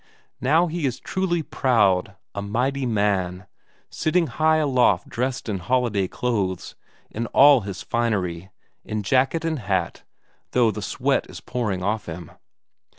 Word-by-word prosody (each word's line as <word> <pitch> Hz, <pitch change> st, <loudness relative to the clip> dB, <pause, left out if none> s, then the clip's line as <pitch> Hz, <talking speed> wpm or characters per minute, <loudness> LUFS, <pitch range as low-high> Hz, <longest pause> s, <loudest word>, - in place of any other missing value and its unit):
Now 155 Hz, +7 st, +4 dB
he 165 Hz, -3 st, -2 dB
is 125 Hz, -, -4 dB
truly 175 Hz, -3 st, -1 dB
proud, 105 Hz, -11 st, +2 dB, 0.2 s
a 100 Hz, -, -4 dB
mighty 125 Hz, +6 st, -1 dB
man, 100 Hz, -4 st, 0 dB, 0.5 s
sitting 170 Hz, +2 st, +1 dB
high 155 Hz, 0 st, +2 dB
aloft 130 Hz, -, +2 dB
dressed 125 Hz, +1 st, -3 dB
in 100 Hz, -4 st, -2 dB
holiday 105 Hz, -1 st, +1 dB
clothes, 100 Hz, -6 st, -2 dB, 0.4 s
in 115 Hz, +2 st, -3 dB
all 140 Hz, 0 st, +6 dB
his 100 Hz, -2 st, -6 dB
finery; 95 Hz, -7 st, -1 dB, 0.3 s
in 110 Hz, -1 st, -4 dB
jacket 135 Hz, -, +1 dB
and 160 Hz, -3 st, -1 dB
hat, 95 Hz, -6 st, -2 dB, 0.5 s
though 120 Hz, -3 st, +4 dB
the -, -, -6 dB
sweat -, -, 0 dB
is -, -, -9 dB
pouring 105 Hz, -7 st, -3 dB
off 105 Hz, +3 st, -1 dB
him. 85 Hz, 0 st, -7 dB
115 Hz, 140 wpm, -23 LUFS, 95-135 Hz, 0.5 s, all